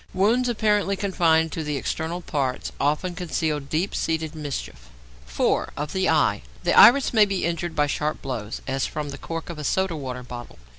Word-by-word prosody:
Wounds 230 +7 +3
apparently 210 -3 +1
confined 165 -5 +2
to 160 - -3
the 150 -1 -2
external 160 +6 -3
parts 135 -6 -2
often 150 +5 0
conceal 160 -4 -1
deep 155 +7 -2
seated 160 -1 -1
mischief. 140 - -6 0.4
4. - - 0
=Of 150 +1 -4
the 190 0 +1
Eye.= - - +2 0.2
The - - +2
iris 270 +1 +7
may 215 -2 +6
be 195 -4 -1
injured 170 0 -2
by 150 - +3
sharp 150 +1 -2
blows, 115 -6 -5
as 135 0 -1
from 150 -1 -4
the 140 - -7
cork 165 +1 -5
of 160 - -8
a - - -5
soda 190 +3 0
water 130 -4 -5
bottle. 120 - -9
160 Hz, 185 wpm, -24 LUFS, 145-185 Hz, 0.4 s, iris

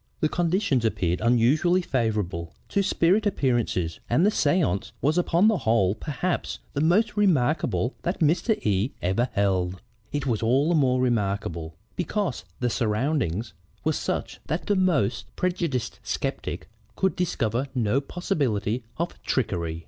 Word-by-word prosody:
"The 155 - +2
conditions 170 - +1
appeared 90 -6 0
unusually 130 +11 +3
favorable 105 - -1
to 200 - +2
spirit 200 +2 +2
appearances 120 - 0
and 150 +10 +3
the 210 - +4
séance 145 - +1
was 150 +3 +1
upon 175 +2 +3
the 220 -4 +3
whole 110 -7 +2
perhaps 160 +9 -3 0.2
the 145 - -1
most 205 +8 +3
remarkable 155 - +2
that 175 - -2
Mr. 170 +8 +2
E 105 +4 +1
ever 95 +8 +1
held. 95 -3 0 0.3
It 145 0 -2
was 115 -6 0
all 130 +7 +3
the - - +3
more 130 -5 +3
remarkable 100 -9 -1 0.2
because 180 - -2 0.2
the 125 - +2
surroundings 115 - 0 0.3
were - - +2
such - - -3
that 160 - -2
the 205 - +2
most 165 - +1
prejudiced 170 - -1
skeptic - - -3 0.3
could 190 0 +1
discover 130 - -1
no 120 +2 +2
possibility 130 - -1
of 170 +1 -4
trickery. 85 -10 -1
130 Hz, 140 wpm, -25 LUFS, 105-175 Hz, 0.3 s, the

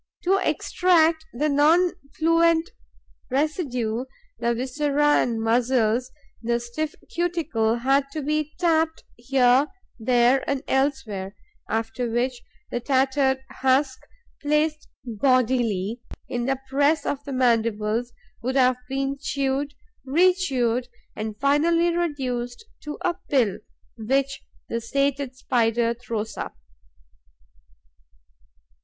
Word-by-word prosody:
To 385 +2 +3
extract 325 -3 +2
the 290 +6 -1
non 315 +5 +4 0.3
fluent 330 +2 +3 0.6
residue, 255 -5 -1 0.3
the 235 0 +1
viscera 290 +4 +1
and 230 -2 -1
muscles, 240 +1 +1 0.3
the 235 0 0
stiff 240 +6 -4 0.2
cuticle 320 -11 0
had 270 +3 +1
to 310 - -3
be 305 +1 -1
tapped 325 -2 +1
here, 255 +2 +3 0.3
there 245 +3 +3
and 280 -1 -1
elsewhere, 250 -8 -1 0.3
after 225 +2 -2
which 240 +1 -1 0.3
the 240 - -1
tattered 265 +1 +1
husk, 260 0 +1 0.4
placed 300 +1 0 0.2
bodily 235 -3 +1 0.3
in 240 0 -2
the 270 -1 0
press 285 +4 +2
of 285 0 -2
the 285 - -7
mandibles, 230 -2 +1 0.3
would 255 +3 -2
have 255 -2 +4
been 275 +1 -2
chewed, 280 0 -1 0.3
rechewed 270 -6 +2 0.3
and 215 -1 -5
finally 335 +5 +3
reduced 260 - -2 0.2
to 300 0 -5
a 350 - +2 0.2
pill, 220 -8 +2 0.4
which 270 +4 0 0.3
the 230 - -3
sated 275 +2 -1
Spider 235 -2 +1
throws 225 -2 -5
up. - - -5
265 Hz, 105 wpm, -24 LUFS, 235-295 Hz, 0.6 s, non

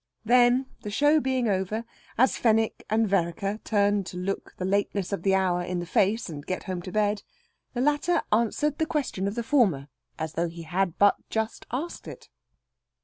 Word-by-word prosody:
Then, 245 +2 +5 0.2
the 210 - -5
show 290 +8 +4
being 260 -4 0
over, 205 +3 -1 0.3
as 260 +2 +4
Fenwick 225 -1 +1
and 220 +1 +2
Vereker 195 +2 0
turned 205 -2 +1
to 180 - -7
look 190 +2 -4
the 185 - -3
lateness 200 0 0
of 195 - -2
the 195 +1 +3
hour 185 -2 +1
in 180 0 -3
the 175 - -3
face, 205 +6 +1
and 150 -4 -7
get 185 +4 -4
home 185 -2 -4
to 185 - -8
bed, 210 0 +1 0.5
the 240 - 0
latter 295 +5 +2
answered 235 +7 +1
the 320 - +1
question 265 - -1
of 200 - -3
the 235 - -2
former, 200 - +2 0.3
as 160 0 -4
though 170 +1 -1
he 170 0 -9
had 180 +1 -1
but 205 0 +5
just 220 0 -3
asked 290 +8 -4
it. - - -10
205 Hz, 190 wpm, -26 LUFS, 185-240 Hz, 0.5 s, Then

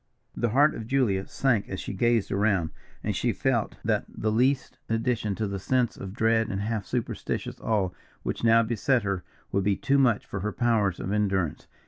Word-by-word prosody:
The 120 - 0
heart 145 +7 +4
of 110 - -6
Julia 115 -8 +1
sank 120 -7 +1
as 95 - -4
she - - -5
gazed 115 +1 +2
around; 100 -6 +1 0.3
and - - -1
she - - +1
felt - - 0
that - - +1
the 110 - -2
least 130 +4 +1
addition 115 -2 0
to 110 - -1
the 100 0 -3
sense 125 +5 +1
of 95 +1 -7
dread 115 0 +2
and 95 - -2
half 105 -1 -2
superstitious 120 -3 -3
awe 100 -5 +1 0.3
which - - -3
now 115 0 +6
beset 120 +2 +1
her, 100 -3 -2 0.3
would 100 0 +1
be 100 0 +2
too 140 +6 +2
much 120 -6 +3
for 100 - -5
her 105 +3 -2
powers 110 -6 +1
of 95 - -3
endurance. 95 -6 0
110 Hz, 190 wpm, -27 LUFS, 100-120 Hz, 0.3 s, now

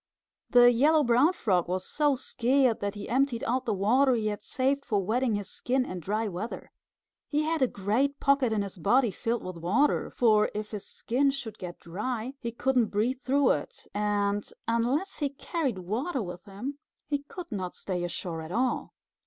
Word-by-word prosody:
The 245 -1 +7
Yellow 295 +6 +4
Brown 250 +6 +4
Frog 190 - +1
was 185 +1 -2
so 295 -2 +2
scared 255 -1 +2
that 200 +1 -3
he 205 0 -6
emptied 260 0 +1
out 255 0 0
the 220 - +1
water 250 +7 +3
he 215 -2 0
had 210 - -4
saved 275 +2 0
for 210 -5 0
wetting 225 +4 +1
his 205 -2 -3
skin 255 +1 0
in 185 - -5
dry 210 +6 -1
weather. 200 +4 -6 0.6
He 300 +1 +1
had 320 0 -1
a 260 - +5
great 235 +8 0
pocket 275 -4 +3
in 210 -2 +1
his 195 -1 -8
body 240 +7 +3
filled 230 +4 -2
with 185 -1 -6
water, 215 - +2
for 215 -3 +3
if 210 0 -4
his 210 -3 -6
skin 270 +4 +1
should 265 -6 -5
get 175 -1 -7
dry 225 +8 -4
he 235 - -4
couldn't 250 0 +2
breathe 240 +6 -1
through 275 0 +3
it, 145 - -4
and 205 0 0 0.2
unless 245 +11 0
he 290 -3 0
carried 280 - -2
water 230 - -2
with 180 0 -8
him 240 +9 -6 0.3
he 290 -1 0
could 340 +5 -9
not 185 -4 -4
stay 180 -2 -3
ashore 175 -1 -3
at 160 +1 -8
all. 250 +5 -1
235 Hz, 185 wpm, -28 LUFS, 205-270 Hz, 0.6 s, The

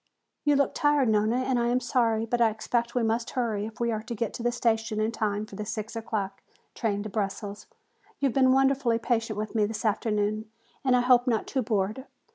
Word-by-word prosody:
"You 290 -1 +4
look 280 -1 +2
tired, 290 -4 +3
Nona, 215 +2 +2
and 255 -1 +1
I 235 - +1
am 245 +1 +2
sorry, 230 -3 +1
but 240 +1 -1
I 230 - +6
expect 235 +2 -2
we 245 - +2
must 230 +1 0
hurry 220 -5 -1
if 225 +3 -12
we 235 -1 +1
are 215 -1 -2
to 230 +2 -6
get 225 0 -2
to - - -6
the 240 +1 +1
station 225 -2 0
in 215 +1 +1
time 215 -2 -1
for 205 - -12
the 210 - -4
six 215 +1 -5
o'clock 215 -3 -3 0.3
train 205 -3 -1
to 215 - -5
Brussels. 200 0 -4 0.5
You 280 - 0
have 265 - +2
been 260 -1 +4
wonderfully 270 -3 +3
patient 230 -2 -1
with 215 0 -4
me 215 -2 +3
this 215 +1 -4
afternoon 215 0 0 0.3
and 260 -2 +4
I 250 - +4
hope 250 0 +4
not 225 -3 +1
too 265 - -1
bored. 215 +3 -1
225 Hz, 225 wpm, -27 LUFS, 215-245 Hz, 0.5 s, I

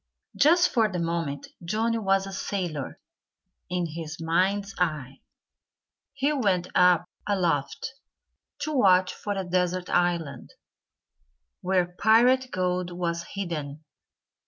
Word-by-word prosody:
Just 340 +5 +5
for 225 -3 +3
the 180 - -3
moment 165 -4 -3
Johnnie 225 +6 0
was 195 -2 +1
a 195 - -7
sailor 175 -8 -4 0.7
in 180 0 -1
his 160 -1 -6
mind's 190 +5 0
eye. 150 -6 -2 0.9
He 285 +2 +1
went 195 -10 0
up 180 -1 +4 0.2
aloft 175 - -1 0.7
to 310 - -2
watch 185 -8 +4
for 205 - -4
a 195 -1 -3
desert 180 0 -1
island, 175 -4 -1 1.1
where 185 -1 +2
pirate 250 +4 +4
gold 180 -2 -1
was 170 -1 -3
hidden. 155 -6 -4
180 Hz, 110 wpm, -26 LUFS, 170-200 Hz, 1.1 s, Just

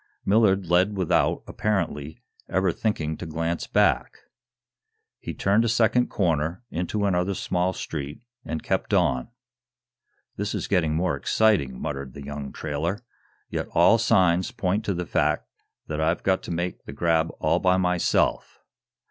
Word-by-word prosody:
Millard 100 -2 +3
led 90 +4 +2
without, 95 -4 +1
apparently, 80 -8 -2 0.3
ever 95 0 +2
thinking 80 -7 -2
to 90 - -7
glance 80 +1 -2
back. - - +2 1.0
He - - -6
turned 100 +4 +2
a 115 - +1
second 120 +2 +3
corner, 85 +1 -1
into 90 +5 -1
another 95 0 +1
small 90 +1 0
street, 75 +1 -6 0.2
and 80 +1 -4
kept - - 0
on. 65 0 +1 1.1
"This - - -2
is - - -3
getting 80 -5 +1
more 85 -2 +1
exciting," 70 - +1
muttered 70 -3 -5
the 70 - -8
young 70 -1 -6
trailer. 85 +9 -3 0.5
"Yet - - -2
all 115 +7 +6
signs 90 -5 +3
point 100 +3 -1
to 100 - -1
the 90 0 -3
fact - - 0 0.4
that 80 0 -3
I've 80 +2 0
got 95 -1 +2
to - - -5
make 85 +2 -3
the 70 - -8
grab 80 +1 +1
all - - +2
by 90 0 +3
myself. 90 -2 +1
90 Hz, 150 wpm, -25 LUFS, 80-95 Hz, 1.1 s, all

